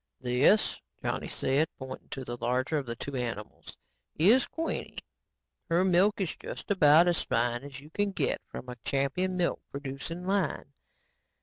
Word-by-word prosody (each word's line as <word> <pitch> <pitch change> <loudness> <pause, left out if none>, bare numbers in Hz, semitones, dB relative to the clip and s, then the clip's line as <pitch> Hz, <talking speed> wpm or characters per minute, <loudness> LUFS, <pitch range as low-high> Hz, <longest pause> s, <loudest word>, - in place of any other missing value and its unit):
"This." 125 - +3 0.2
Johnny - - -2
said, 140 +4 +1
pointing 130 -1 -8
to 135 -2 -5
the 120 - -4
larger 125 +5 0
of 135 - -7
the 115 - -3
two 140 +4 -6
animals, 115 -4 -5 0.4
"is 220 +11 +5
Queenie. 325 0 -4 0.7
Her 170 +3 +3
milk 190 +4 +4
is 185 -5 -1
just - - -7
about 165 -2 +6
as 175 -2 +2
fine 120 +1 0
as 140 -2 -8
you 150 +3 -15
can 205 +3 0
get - - 0
from 125 - -8
a 125 0 -7
champion 160 +7 0
milk 175 -1 0
producing 140 +5 -6
line. 190 -7 -1
145 Hz, 160 wpm, -29 LUFS, 130-180 Hz, 0.7 s, about